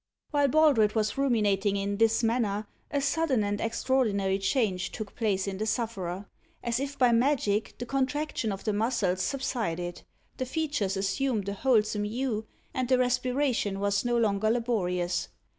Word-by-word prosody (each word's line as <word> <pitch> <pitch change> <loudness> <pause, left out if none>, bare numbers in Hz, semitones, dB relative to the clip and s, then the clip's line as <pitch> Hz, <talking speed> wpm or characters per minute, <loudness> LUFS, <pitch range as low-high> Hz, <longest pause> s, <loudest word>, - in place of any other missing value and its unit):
While 290 -2 +3
Baldred 275 -8 +4
was 215 -1 +1
ruminating 210 -7 +2
in 200 0 -2
this 225 +1 +3
manner, 220 -3 0 0.2
a 285 -1 0
sudden 280 -4 +1
and 205 0 -2
extraordinary 220 -5 +1
change 195 -4 0
took 215 -3 -6
place 200 -4 0
in 195 -1 -4
the 215 - -1
sufferer. 200 -5 -2 0.4
As 235 0 0
if 280 +1 -4
by 250 -3 +4
magic, 230 -4 +1
the 245 - -5
contraction 270 -2 -1
of 195 - -5
the 215 - 0
muscles 210 -4 0
subsided; 180 -11 -2 0.4
the 255 - -2
features 285 - -1
assumed 210 +2 0
a - - -2
wholesome 210 -2 +2
hue, 220 -1 -2 0.3
and 255 -1 -1
the 255 - +5
respiration 250 -4 0
was 200 0 +1
no 240 -1 +1
longer 215 -2 +2
laborious. 180 -7 0
225 Hz, 155 wpm, -28 LUFS, 200-255 Hz, 0.4 s, the